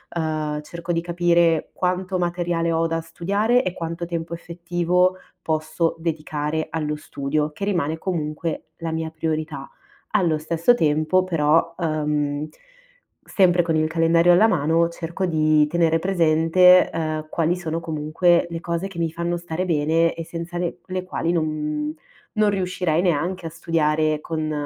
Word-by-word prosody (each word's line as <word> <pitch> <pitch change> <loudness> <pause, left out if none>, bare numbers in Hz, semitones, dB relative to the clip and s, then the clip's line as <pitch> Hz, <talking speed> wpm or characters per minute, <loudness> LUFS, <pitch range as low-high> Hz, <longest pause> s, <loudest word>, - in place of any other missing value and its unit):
uhm, 155 -2 -2
cerco 170 +3 -6
di 165 -1 0
capire 170 -1 +2
quanto 185 +1 -1
materiale 175 -1 -1
ho 165 0 +1
da 165 0 -2
studiare 205 +9 +1
e 185 - -2
quanto 170 +1 -4
tempo 170 -1 -4
effettivo 175 +2 0 0.3
posso 160 +1 -1
dedicare 155 -1 -2
allo 150 -1 -2
studio, 150 0 -2
che 155 - -8
rimane 165 -6 -1
comunque 160 -2 -3
la 165 -1 -4
mia 160 0 -3
priorità. 155 -3 -3 0.4
Allo 165 -5 +2
stesso 165 +7 +2
tempo 155 -1 +2
però, 165 -1 +2
uhm, 150 -2 -1 0.7
sempre 180 -3 +3
con 165 -2 0
il 155 0 +2
calendario 165 +2 +3
alla 205 +6 +6
mano 165 -3 +2
cerco 170 +2 -4
di 155 -2 +3
tenere 165 0 +2
presente, 180 0 +5
uhm, 155 -1 -3
quali 165 +1 +1
sono 165 -2 -3
comunque 165 +2 +1
le 165 -1 -4
cose 170 +2 -3
che 195 -3 -12
mi 165 -1 -1
fanno 170 +1 -2
stare 175 +1 -3
bene 165 0 +2
e 165 - -6
senza 170 +1 -6
le 175 -1 -3
le 185 -1 -3
quali 175 -2 -2
non 150 -2 -1 0.4
non 215 -1 +3
riuscirei 180 -4 0
neanche 175 +1 0
a - - -3
studiare 155 -2 0
con 155 -1 -3
165 Hz, 150 wpm, -22 LUFS, 155-175 Hz, 0.7 s, alla